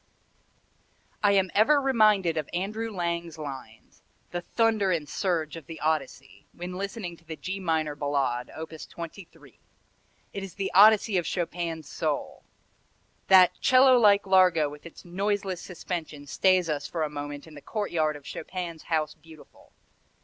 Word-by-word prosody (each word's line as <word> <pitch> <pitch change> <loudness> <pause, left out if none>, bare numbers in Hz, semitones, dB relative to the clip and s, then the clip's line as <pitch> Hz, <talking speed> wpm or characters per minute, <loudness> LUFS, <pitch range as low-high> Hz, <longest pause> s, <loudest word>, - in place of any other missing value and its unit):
I 205 -1 +4
am 190 -2 +2
ever 285 +8 +5
reminded 215 -10 +3
of 155 -3 -3
Andrew 210 +5 -2
Lang's 170 -3 -3
lines, 135 -7 -9 0.3
"the 175 - -3
thunder 220 +1 +1
and 160 -4 -1
surge 170 -5 -1
of 165 -3 -10
the 165 - -8
Odyssey," 145 -2 -3
when 180 +1 -7
listening 195 -1 -5
to 170 - -23
the 160 -1 -7
G 190 +5 -5
minor 160 -4 -1
Ballade, 140 -4 -1
op. 160 0 -8
23. 160 - -10 0.7
It 200 - -5
is 190 -3 -9
the 195 -1 -3
Odyssey 210 -1 +6
of 170 - -4
Chopin's 170 -3 -3
soul. - - -3 0.9
That 185 -2 +7
'cello 255 0 +6
like 205 -3 +5
largo 185 -5 +4
with 150 +3 -11
its 170 - -14
noiseless 195 0 -2
suspension 165 -5 -6
stays 185 +4 +2
us 145 -2 -2
for 165 -2 -2
a - - 0
moment 145 0 -6
in 160 - -14
the 145 - -11
courtyard 165 -8 -1
of 145 -1 -12
Chopin's 170 -1 -6
House 155 -2 0
Beautiful. 160 -2 -18
170 Hz, 150 wpm, -27 LUFS, 155-195 Hz, 0.9 s, That